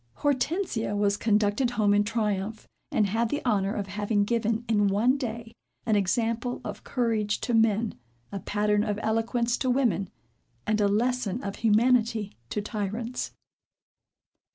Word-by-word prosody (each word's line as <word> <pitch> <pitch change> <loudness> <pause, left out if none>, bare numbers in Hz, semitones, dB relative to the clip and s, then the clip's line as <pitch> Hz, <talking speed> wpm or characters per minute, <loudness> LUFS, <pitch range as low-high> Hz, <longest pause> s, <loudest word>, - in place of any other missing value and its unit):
Hortensia 285 - 0
was 205 0 +2
conducted 210 +3 +2
home 205 -2 +4
in 205 0 +4
triumph, 210 -1 -2 0.2
and 215 - +3
had 225 +3 0
the 290 - -2
honor 200 -3 +1
of 205 - -2
having 205 +1 0
given, 230 +1 0
in 205 -2 +3
one 215 +7 +3
day, 230 -4 -5 0.3
an 220 - +2
example 230 +5 0
of - - -6
courage 225 -5 0
to 240 - -1
men, 225 -1 +3 0.4
a 200 - -4
pattern 210 +1 +1
of 210 -2 -1
eloquence 235 +2 0
to 260 - -1
women, 245 -7 +1 0.6
and 215 0 +1
a 205 - +4
lesson 235 +1 0
of 200 -1 -4
humanity 225 -1 +2
to 210 - -2
tyrants. 225 +3 -3
220 Hz, 145 wpm, -27 LUFS, 205-235 Hz, 0.6 s, home